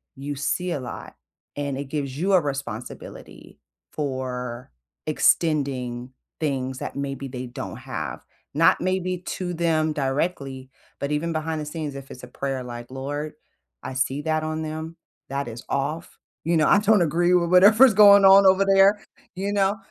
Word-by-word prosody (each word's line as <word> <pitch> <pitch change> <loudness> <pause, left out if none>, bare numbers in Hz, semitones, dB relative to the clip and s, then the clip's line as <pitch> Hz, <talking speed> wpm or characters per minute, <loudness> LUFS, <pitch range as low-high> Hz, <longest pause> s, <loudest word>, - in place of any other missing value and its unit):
you 140 +1 -5
see 165 +6 -1
a 150 - -2
lot, 125 - -8 0.4
and 140 -2 -3
it 140 - -4
gives 140 -1 -4
you 195 +4 +1
a 185 - +6
responsibility, 135 -5 -7 0.3
for 125 -4 -4 0.4
extending 130 -6 +1 0.3
things 130 -3 -2
that - - -6
maybe 140 -1 -4
they 125 0 -6
don't 120 -8 -7
have - - -6 0.3
not, 160 +3 +4
maybe 185 0 -1
to 180 0 -5
them 160 -2 +1
directly, 135 -2 -2 0.3
but 140 +1 -3
even 165 +3 -1
behind 155 0 -2
the - - -5
scenes, 150 -1 -5
if 135 -1 -9
it's 125 - -11
a - - -8
prayer 135 0 -4
like, 120 -1 -8
"Lord, 145 +3 -5 0.5
I - - -5
see 135 +2 -1
that 155 -1 0
on 155 0 -3
them, 160 +1 -6 0.3
that 140 -1 -3
is 115 +1 -9
off," 150 +5 -3 0.3
you 170 +1 +2
know? 155 - +3
"I 200 - +6
don't 210 -1 +4
agree 175 +2 +2
with 170 -1 +3
whatever's 210 +6 +7
going 200 -1 +8
on 195 +1 +8
over 190 +1 +5
there," 195 +1 +4 0.3
you 195 +2 -2
know? 200 +1 +1
150 Hz, 165 wpm, -24 LUFS, 135-175 Hz, 0.5 s, going